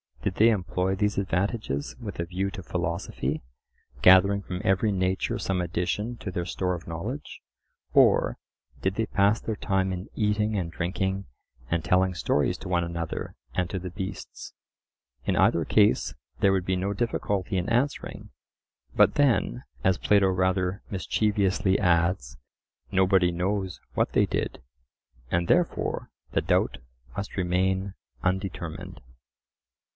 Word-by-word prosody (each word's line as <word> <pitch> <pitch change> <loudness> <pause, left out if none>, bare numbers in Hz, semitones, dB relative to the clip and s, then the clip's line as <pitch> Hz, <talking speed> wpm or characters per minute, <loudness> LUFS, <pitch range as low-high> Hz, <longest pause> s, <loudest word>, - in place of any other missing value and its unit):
Did - - -1
they 110 +2 +6
employ 95 -2 0
these 105 +1 0
advantages 95 - -1
with 105 -8 -7
a 85 - 0
view 95 +3 -2
to 95 -1 -7
philosophy, 85 -5 -2 0.6
gathering 100 +2 +7
from 90 -1 -5
every 100 +2 +2
nature 95 -1 0
some 95 -1 0
addition 90 +7 -2
to 100 - -5
their 90 -1 -2
store 90 +1 -1
of 85 - -10
knowledge? 100 - -5 0.5
or, - - +5 0.4
Did 95 +1 0
they 115 - 0
pass 100 +2 +3
their 110 - -3
time 95 -2 0
in 90 +3 -5
eating 105 0 +1
and 85 -3 -2
drinking 95 +3 -2 0.4
and 85 +1 0
telling 95 +1 +3
stories 75 -4 +1
to - - -8
one 90 -1 +1
another 85 -1 -4 0.2
and 90 -1 +1
to 95 - -2
the 90 +1 -5
beasts?—in 90 - -7
either 85 -2 +3
case 105 - +3 0.2
there 100 -2 +4
would 95 -2 +1
be 95 - +1
no 95 +2 -1
difficulty 100 -3 -1
in 90 +3 -1
answering. 125 +5 -1 0.7
But - - +5
then, 115 - +2 0.2
as 95 -1 +3
Plato 100 -2 +4
rather 95 +1 +1
mischievously 100 -1 +1
adds, 85 - +1 0.5
"Nobody 95 -1 +4
knows 95 +2 -2
what - - 0
they - - +4
did," - - -3 0.7
and 85 +3 +1
therefore - - +1 0.2
the - - +1
doubt - - +1 0.4
must 100 0 -5
remain 95 +1 +1 0.3
undetermined. 95 -3 -3
95 Hz, 140 wpm, -27 LUFS, 90-100 Hz, 0.7 s, gathering